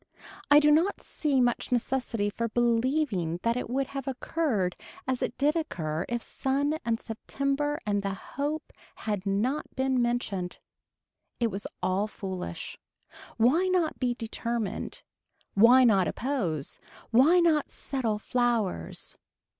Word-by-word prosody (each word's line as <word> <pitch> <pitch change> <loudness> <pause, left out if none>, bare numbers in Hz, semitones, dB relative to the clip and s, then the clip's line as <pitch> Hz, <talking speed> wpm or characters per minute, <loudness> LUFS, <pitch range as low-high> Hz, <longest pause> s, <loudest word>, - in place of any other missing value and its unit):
I 290 0 +9
do 300 0 +5
not 335 +7 +3
see 285 -4 0
much 245 0 +1
necessity 240 -4 0
for 230 +2 -2
believing 235 - +1
that 230 0 +2
it 250 - -3
would 270 +2 0
have 275 -1 -5
occurred 255 - -1 0.3
as 260 -1 0
it - - -2
did 290 +4 +2
occur 165 - -2
if 240 -1 -2
sun 285 +3 -1
and 230 -1 0
September 275 +6 -2
and 205 -1 +1
the 195 -1 -2
hope 290 +9 -4 0.2
had 205 -3 -3
not 235 +10 0
been 260 -1 +1
mentioned. 215 -7 -1 0.8
It 230 -2 +1
was 200 +2 -4 0.2
all 195 +3 +1
foolish. 185 - -6 0.6
Why 295 +11 +4
not 360 -4 +1
be 245 -2 +1
determined. 230 -2 -3 0.5
Why 240 +5 +7
not 200 -7 +4
oppose. 195 - -2 0.3
Why 280 +10 +6
not 320 -4 +3
settle 235 -6 -2
flowers. 225 - -1
240 Hz, 130 wpm, -28 LUFS, 205-275 Hz, 0.8 s, I